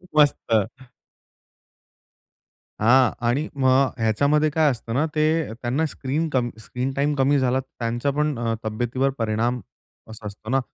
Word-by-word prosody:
मस्त. 150 -1 +5 2.4
हां 125 +2 +5 0.2
आणि 140 +7 +1
मग 130 +1 +4
ह्याच्यामध्ये 140 +7 +2
काय 155 0 +3
असतं 115 -2 -5
ना, 140 +6 +2
ते 155 -4 +1
त्यांना 125 +7 -1
स्क्रीन 150 +2 -2
कम 125 -4 0
स्क्रीन 125 +4 -3
टाईम 145 +2 +1
कमी 140 +1 +3
झाला, 130 0 +1
त्यांचा 120 +1 -3
पण 150 -1 0
अ, 115 -1 0
तब्येतीवर 120 +5 0
परिणाम 115 +2 0 0.5
असा 110 -1 -8
असतो 105 +2 -10
ना. 135 +2 +3
130 Hz, 135 wpm, -23 LUFS, 120-145 Hz, 2.4 s, मस्त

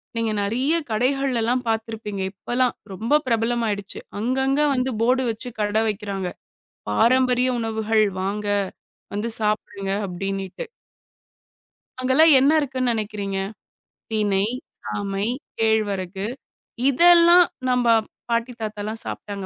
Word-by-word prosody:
நீங்க 230 -1 0
நெறைய 250 +10 0 0.2
கடைகள் 260 +4 +1
எல்லாம் 245 +3 0
பாத்துருப்பீங்க. 220 -3 -3
இப்ப 195 - -18
எல்லாம் 255 -1 +2 0.2
ரொம்ப 225 +8 -2
பிரபலமாயிடுச்சு. 225 -3 -1 0.2
அங்கங்க 265 +5 +1
வந்து 255 0 0
போர்டு 255 +3 +3
வச்சு 230 +3 -4
கடை 210 +1 +1
வைக்கிறாங்க. 200 -2 -3 0.6
பாரம்பரிய 250 - +3
உணவுகள் 220 -1 +1 0.2
வாங்க. 205 +2 -2 0.7
வந்து 210 +3 -2
சாப்பிடுங்க 210 -2 -2 0.2
அப்பிடினிட்டு. 195 - -4 1.4
அங்கெல்லாம் 270 +6 +5
என்ன 275 +3 +4
இருக்குன்னு 255 -3 0
நினைக்கிறீங்க. 205 -3 -3 0.7
தினை, 205 -2 +1 0.4
சாமை, 200 0 -2 0.3
கேழ்வரகு 200 -4 0 0.6
இதெல்லாம் 345 +4 +7 0.2
நம்ப 250 -1 +2 0.4
பாட்டி 235 +1 0
தாத்தால்லாம் 215 +1 -4
சாப்ட்டாங்க 200 -2 -6
220 Hz, 100 wpm, -23 LUFS, 205-255 Hz, 1.4 s, இதெல்லாம்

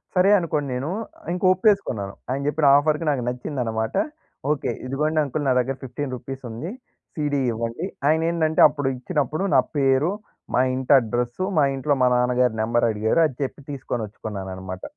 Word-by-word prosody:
సరే 185 +2 +5
అనుకోనేను 145 -5 -2 0.4
ఇంక 180 - -4
ఒప్పేసుకున్నాను. 185 - +1 0.2
ఆయన 135 +2 -1
జెప్పిన 150 -1 +2
ఆఫర్‌కి 155 +2 +1
నాకు 135 -4 0
నచ్చిందనమాట. 125 -3 -2 0.6
ఓకే. 140 -4 -1
ఇదిగోండి 150 +4 0
అంకల్ 145 +1 -3
నా 130 - +4
దగ్గర 130 +2 -1
15 130 +1 -4
రూపీస్ 135 +2 -8
ఉంది, 145 - -6 0.4
సీడీ 145 -2 0
ఇవ్వండి. 115 +9 -3 0.2
ఆయనేందంటే 160 0 +2
అప్పుడు 145 -2 -2
ఇచ్చినప్పుడు 150 +5 -1
నా 130 - +7 0.2
పేరు, 135 +4 +3 0.4
మా - - +4
ఇంటి 130 +1 +2
అడ్రెస్సు, 120 +8 -2
మా 145 - +5
ఇంట్లో 140 +2 +1
మా 125 - +5
నాన్నగారు 125 -1 +2
నెంబర్ 115 +1 +2
అడిగారు 110 +9 +1
అది 130 - -10
చెప్పి 135 - -5
తీసుకోచ్చుకున్నానన్నమాట. 100 -7 -5
135 Hz, 145 wpm, -23 LUFS, 120-150 Hz, 0.6 s, నా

